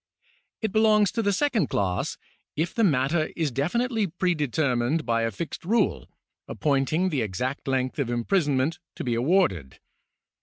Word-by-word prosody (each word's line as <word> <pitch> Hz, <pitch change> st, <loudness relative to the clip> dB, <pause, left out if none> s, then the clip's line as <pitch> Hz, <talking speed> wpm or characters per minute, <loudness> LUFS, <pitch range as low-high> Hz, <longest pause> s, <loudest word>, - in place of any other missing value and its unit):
It 220 Hz, -, 0 dB
belongs 215 Hz, -2 st, +4 dB
to 230 Hz, -, -1 dB
the 205 Hz, -2 st, +1 dB
second 225 Hz, -, +1 dB
class, 95 Hz, -3 st, -1 dB, 0.4 s
if 165 Hz, +3 st, -1 dB
the 230 Hz, -, +1 dB
matter 155 Hz, -1 st, +2 dB
is 160 Hz, -4 st, -1 dB
definitely 220 Hz, -, 0 dB
predetermined 155 Hz, -5 st, 0 dB
by 115 Hz, -1 st, +1 dB
a 115 Hz, -, +1 dB
fixed 130 Hz, -, -6 dB
rule, 225 Hz, +7 st, 0 dB, 0.4 s
appointing 150 Hz, +5 st, 0 dB
the 145 Hz, -7 st, -1 dB
exact 125 Hz, +8 st, -3 dB
length 130 Hz, +1 st, -1 dB
of 135 Hz, -4 st, 0 dB
imprisonment 145 Hz, -, 0 dB, 0.2 s
to -, -, -5 dB
be 120 Hz, -, -1 dB
awarded. 115 Hz, -, +1 dB
150 Hz, 145 wpm, -26 LUFS, 125-190 Hz, 0.4 s, belongs